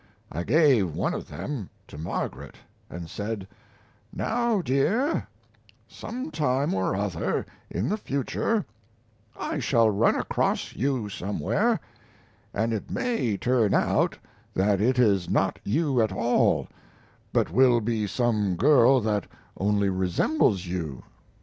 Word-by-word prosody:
I 85 - -3
gave 125 - +3
one - - 0
of - - -5
them 130 -11 -5 0.2
to - - -12
Margaret 80 +2 -4 0.3
and 85 0 -7
said: 100 +2 -5 0.6
"Now 235 -2 0
dear, 170 - +1 0.6
sometime 150 - -2
or 95 0 0
other 95 -4 -1 0.2
in 95 +7 -2
the 210 - 0
future 200 - -1 0.7
I - - -2
shall 115 -2 +3
run 105 +3 +3
across - - -1
you 130 -2 -1
somewhere, 100 -5 0 0.7
and 115 +2 0
it 110 - -4
may 225 - -1
turn 120 -4 +2
out - - +2 0.4
that 100 +1 +2
it 125 +4 +2
is 100 -7 +3
not - - +1
you 135 +2 +1
at 110 -2 +1
all, 115 +6 +2 0.6
but - - +1
will 125 +3 +5
be 110 -2 -1
some 105 -4 0
girl 130 - +5
that 105 -3 -1 0.3
only 100 0 +1
resembles 95 - +1
you. 80 -8 -4
110 Hz, 125 wpm, -26 LUFS, 95-135 Hz, 0.7 s, will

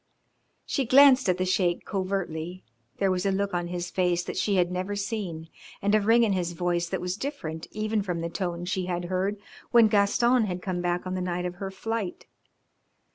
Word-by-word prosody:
She 270 - -1
glanced 270 -3 +7
at 180 - +2
the 185 - 0
Sheik 180 -2 +1
covertly. 185 -3 -3 0.3
There 195 -1 +2
was 180 -1 0
a 200 - +1
look 200 0 -1
on 175 -1 -1
his 175 0 -4
face 180 -2 +1
that - - -6
she 205 - +1
had 180 -1 +2
never 185 +3 -2
seen 200 -6 -4 0.3
and 205 +1 +1
a 215 - +5
ring 225 +3 +4
in 215 -3 +2
his 175 -2 -1
voice 175 0 -1
that - - -2
was 180 +1 -3
different 165 - -5
even 215 0 -1
from 180 -4 -3
the 165 - -2
tone 175 0 -3
she 180 0 -2
had 175 -1 -2
heard 195 +3 0 0.3
when 235 -2 +6
Gaston 225 +4 +3
had 180 -3 -3
come 180 -2 -2
back 175 0 -1
on 185 - -3
the 185 - -2
night 180 0 -2
of 180 0 -4
her 195 0 -4
flight. 220 0 -4
185 Hz, 205 wpm, -27 LUFS, 175-205 Hz, 0.3 s, glanced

